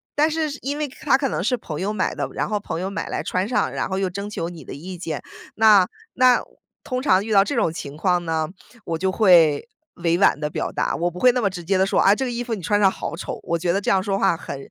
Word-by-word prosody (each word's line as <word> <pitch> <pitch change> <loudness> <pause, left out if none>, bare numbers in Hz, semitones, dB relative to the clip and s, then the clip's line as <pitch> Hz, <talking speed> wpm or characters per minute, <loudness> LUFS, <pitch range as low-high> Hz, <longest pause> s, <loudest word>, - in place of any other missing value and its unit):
但 305 +2 +3
是 315 -1 -1
因 285 +2 -3
为 300 -1 -1
它 275 +1 +1
可 270 -2 -1
能 - - -2
是 250 +3 +1
朋 160 -6 -6
友 200 - -1
买 190 - -1
的， - - -3
然 - - -2
后 210 -1 -1
朋 165 -4 -5
友 190 +2 -3
买 200 - -4
来 - - -3
穿 185 +2 -1
上， 250 - +1
然 - - -2
后 190 - -2
又 190 -1 0
征 200 +3 -5
求 170 -5 -4
你 170 -4 -10
的 - - -9
意 180 +6 -8
见。 160 -4 -4 0.3
那 210 -4 +6 0.3
那 255 -1 +4 0.4
通 255 -1 -3
常 210 -8 +3
遇 220 - -5
到 195 -1 +6
这 - - -3
种 160 - +1
情 145 -3 -7
况 180 0 +1
呢， 160 -1 -1 0.4
我 165 - -2
就 190 +3 0
会 175 -4 +4 0.3
委 170 0 +1
婉 190 - +3
地 150 0 -2
表 - - -3
达。 - - -1
我 175 +1 0
不 180 - -9
会 250 +4 +6
那 250 - 0
么 200 - +2
直 180 -2 -8
接 190 +3 +1
地 190 - +3
说： 195 - +1
“啊， 195 - +6
这 265 - -2
个 245 - -3
衣 235 - -3
服 235 - -4
你 200 - -8
穿 205 +4 +1
上 195 - +6
好 165 - -5
丑。” - - -5
我 170 - -1
觉 175 0 0
得 195 - +1
这 - - -2
样 190 -1 +3
说 195 -1 -1
话 195 -3 +2
很 140 - -7
195 Hz, 305 characters per minute, -22 LUFS, 170-225 Hz, 0.4 s, 那